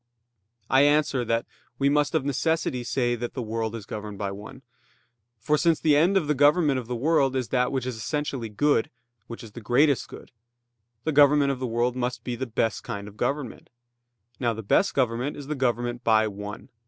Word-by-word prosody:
I 130 +2 +4
answer 145 -3 +3
that, 115 +1 0 0.3
We 140 - +2
must 150 +2 +2
of 150 -4 +1
necessity 140 -2 0
say 120 0 0
that 120 0 -5
the 130 - -3
world 110 0 -3
is 110 -4 -7
governed 105 -1 -7
by 100 0 -3
one. 105 +7 -10 0.7
For 150 +8 0
since 165 -2 +2
the 150 -2 +3
end 175 +7 +4
of 175 - +1
the 150 - +1
government 145 0 +3
of 120 - -8
the 125 - -3
world 135 0 +2
is 130 -3 -2
that 125 -1 +1
which 130 -3 -2
is 125 -3 -4
essentially 135 -2 -3
good, 115 +3 +1 0.4
which 115 - -8
is 110 - -11
the 120 - -10
greatest 135 +5 +2
good; - - -12 0.7
the 160 - 0
government 145 -1 +5
of 135 - -4
the 130 - -2
world 120 +2 0
must 125 0 -3
be 125 - -3
the 130 +2 -4
best 115 -1 -1
kind 100 0 -6
of 105 - -12
government. 130 +2 -3 0.7
Now 120 -3 0
the 110 - -7
best 190 - +2
government 125 +2 0
is 145 - -8
the 150 - -3
government 120 -2 -1
by 110 -1 +4
one. 105 0 -8
125 Hz, 205 wpm, -25 LUFS, 115-145 Hz, 0.7 s, government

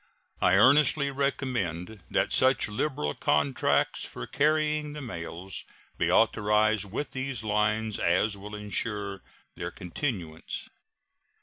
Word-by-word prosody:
I 90 - +5
earnestly 140 +5 +5
recommend 110 -9 -2
that - - +1
such 130 -1 +4
liberal 105 - -1
contracts 75 -2 +1
for - - -6
carrying 150 0 +1
the 150 - -7
mails 90 -3 -5 0.4
be - - +2
authorized 105 0 +3
with 115 +9 -4
these 130 -4 -2
lines 105 0 0
as 95 +5 +2
will 105 +2 -8
insure 105 -1 -3 0.3
their - - -5
continuance. 90 - -4
105 Hz, 110 wpm, -28 LUFS, 95-135 Hz, 0.4 s, I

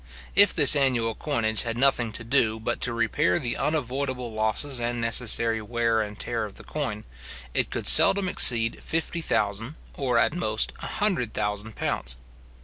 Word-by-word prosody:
If 205 0 +6
this 150 -3 +8
annual 125 -5 0
coinage 110 -6 -2
had 115 0 -4
nothing 125 -3 +1
to 115 - -6
do 115 -3 0
but 110 - -4
to 125 - -1
repair 110 -6 0
the 120 -1 -4
unavoidable 130 -4 -3
losses 110 +5 0
and 120 0 -3
necessary 115 -1 0
wear 115 0 -1
and 105 -1 -6
tear 115 0 -3
of 105 -2 -8
the - - -13
coin, 125 -9 -5 0.5
it - - -1
could - - -4
seldom 195 -1 +6
exceed 115 -9 +3
fifty 165 +1 -1
thousand, 110 +1 -2 0.2
or 125 -4 -2
at 115 - +1
most 110 -11 -2
a - - -7
hundred 190 - -2
thousand 105 +1 -4
pounds. 65 0 -3
115 Hz, 165 wpm, -24 LUFS, 110-135 Hz, 0.5 s, this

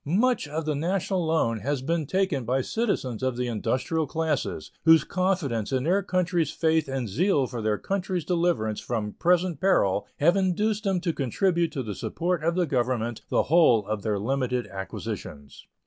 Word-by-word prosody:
Much 215 - +1
of 155 +2 -4
the 155 - 0
national 180 +4 -1
loan 115 -9 +1
has 135 +4 -2
been 160 0 -1
taken 185 -6 0
by 125 +3 0
citizens 135 - -2
of 130 -2 -1
the 125 - -1
industrial 130 +7 -1
classes, 160 -1 -2
whose 160 -2 +6
confidence 170 - -1
in 130 -1 0
their 185 +6 +2
country's 175 -4 0
faith 160 -1 +1
and 135 -3 -3
zeal 145 - +2
for 120 -2 -5
their 105 -1 0
country's 185 - -2
deliverance 170 - 0
from 110 -3 -3
present 175 -2 +1
peril 100 - +2
have 170 +5 +4
induced 205 +3 0
them 190 -2 +1
to 170 -2 -1
contribute 170 - 0
to 135 - -3
the 105 -3 -4
support 175 - -2
of 170 +1 +1
the 180 -1 +2
Government 120 -4 -1
the - - +2
whole 135 - +4
of 105 0 -3
their 105 -1 -1
limited 125 +2 -1
acquisitions. 75 -6 -7
155 Hz, 175 wpm, -26 LUFS, 120-180 Hz, -, whose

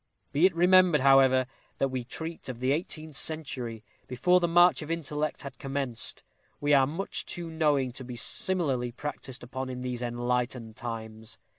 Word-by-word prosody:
Be 155 +5 +5
it 185 - -5
remembered, 180 -3 +5
however, 135 -1 +5 0.3
that 135 - +1
we 130 -1 -3
treat 160 +5 -7
of 120 -2 -6
the 130 +1 +1
eighteenth 155 0 -3
century, 130 -8 -2 0.2
before 180 +9 +3
the 175 - +1
march 175 +1 +5
of 150 - -7
intellect 155 -2 -2
had 140 - -9
commenced; 135 -4 -3 0.4
we 145 0 +2
are 135 -2 +5
much 170 +7 -3
too 170 -2 -6
knowing 145 -5 +1
to 130 +2 -8
be 125 -1 -7
similarly 130 -2 +1
practised 135 -1 -7
upon 130 +1 -5
in 125 -1 -5
these 125 -1 -4
enlightened 120 -1 -2
times. 110 -3 -7
135 Hz, 165 wpm, -28 LUFS, 125-160 Hz, 0.4 s, Be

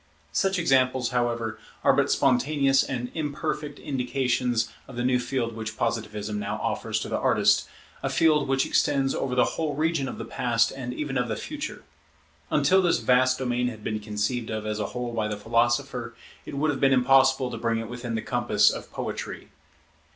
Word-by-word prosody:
Such 195 -1 +1
examples, 130 -6 +2
however, 120 -3 -1 0.2
are - - +5
but - - +2
spontaneous 135 +1 +3
and 125 -2 -4
imperfect 150 -1 -3
indications 125 -3 0 0.2
of 135 - -10
the 120 - -2
new 125 0 +3
field 120 -2 -2
which 110 -1 -5
Positivism 105 -2 -2
now 105 - -3
offers - - -2
to - - -4
the - - -1
artist; - - +3 0.3
a - - -1
field 155 -3 +3
which 135 0 +2
extends 135 -2 +2
over 125 -2 -2
the 125 - +4
whole 155 -3 -2
region 155 -2 0
of - - -6
the 115 - -5
Past 120 0 +1
and 130 -2 -5
even 135 0 -2
of 125 - 0
the 110 - -2
Future. 300 - -6 0.7
Until 190 +1 +4
this 175 -2 +3
vast 125 +2 +3
domain 125 -1 0
had 110 -3 -6
been 110 0 -2
conceived 105 +3 -2
of 110 -1 -3
as 105 0 -2
a 105 - -1
whole 125 -1 -4
by 110 -2 0
the 105 -1 -3
philosopher, 120 +2 0 0.3
it - - -6
would 150 +2 +2
have 135 - -4
been 135 0 +4
impossible 135 0 +4
to 115 - -5
bring 115 0 0
it 115 0 -4
within 120 0 -5
the 110 - -2
compass - - +3
of - - -7
poetry. - - -5
125 Hz, 190 wpm, -26 LUFS, 115-135 Hz, 0.7 s, are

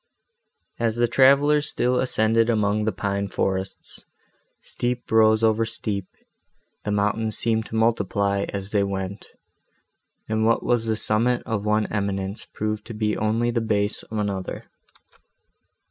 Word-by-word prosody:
As 115 -1 +1
the 120 0 +2
travellers 140 +4 +4
still 125 +1 +1
ascended 115 -2 +2
among 105 -1 +1
the 110 - +1
pine 100 -1 -2
forests, 95 0 -3 0.6
steep 120 0 -4
rose 110 0 +5
over 110 0 +3
steep, 100 -4 -3 0.8
the 105 - -2
mountains 105 +2 0
seemed 110 -1 0
to - - -7
multiply, 100 -3 +1
as 100 0 -5
they 105 - +2
went, 100 0 -3 1.0
and 110 0 0
what 115 +1 +2
was 120 -2 +1
the 110 - +1
summit 115 +3 +1
of 105 -3 -2
one 105 0 +2
eminence 100 -1 -2
proved 105 0 -3
to 115 - -7
be 105 0 0
only 115 +3 +1
the 120 -1 0
base 105 -1 0
of 110 - -7
another. 100 -3 -3
110 Hz, 140 wpm, -24 LUFS, 100-115 Hz, 1.0 s, rose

